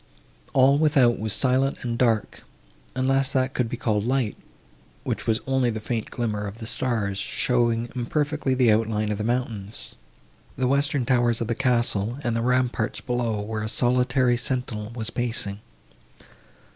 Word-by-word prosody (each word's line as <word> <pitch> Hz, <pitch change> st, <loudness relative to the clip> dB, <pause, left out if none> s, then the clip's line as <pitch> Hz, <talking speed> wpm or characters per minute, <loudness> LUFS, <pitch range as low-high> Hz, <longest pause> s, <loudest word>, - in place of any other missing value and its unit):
All 135 Hz, +2 st, +5 dB
without 140 Hz, -6 st, +4 dB
was 110 Hz, +1 st, -1 dB
silent 130 Hz, +4 st, +2 dB
and 120 Hz, -1 st, -2 dB
dark, 115 Hz, -3 st, 0 dB, 0.5 s
unless 135 Hz, +1 st, +2 dB
that 130 Hz, 0 st, +1 dB
could 125 Hz, -3 st, 0 dB
be 120 Hz, -, -4 dB
called 105 Hz, -4 st, 0 dB
light, 125 Hz, -2 st, 0 dB, 0.7 s
which -, -, -3 dB
was 110 Hz, -1 st, +1 dB
only 130 Hz, -2 st, +1 dB
the 110 Hz, -1 st, -3 dB
faint 110 Hz, 0 st, -3 dB
glimmer 105 Hz, -4 st, -2 dB
of 100 Hz, +2 st, -8 dB
the 115 Hz, -, -7 dB
stars, 110 Hz, -5 st, -1 dB
showing 120 Hz, +1 st, +1 dB
imperfectly 145 Hz, +2 st, -1 dB
the 125 Hz, -3 st, +4 dB
outline 110 Hz, -1 st, +1 dB
of 105 Hz, -, -3 dB
the -, -, -1 dB
mountains, 115 Hz, -3 st, -3 dB, 0.6 s
the 130 Hz, -, 0 dB
western 140 Hz, 0 st, +1 dB
towers 120 Hz, -2 st, +2 dB
of 115 Hz, -, -1 dB
the 115 Hz, -, -1 dB
castle 120 Hz, -3 st, +1 dB
and 120 Hz, -1 st, 0 dB
the 115 Hz, -, 0 dB
ramparts 125 Hz, -1 st, 0 dB
below, 120 Hz, -4 st, -1 dB
where 105 Hz, +1 st, -4 dB
a 110 Hz, -, -2 dB
solitary 125 Hz, +1 st, +2 dB
sentinel 120 Hz, -4 st, -2 dB
was 110 Hz, -2 st, -2 dB
pacing. 115 Hz, -5 st, -1 dB
120 Hz, 160 wpm, -24 LUFS, 110-130 Hz, 0.7 s, All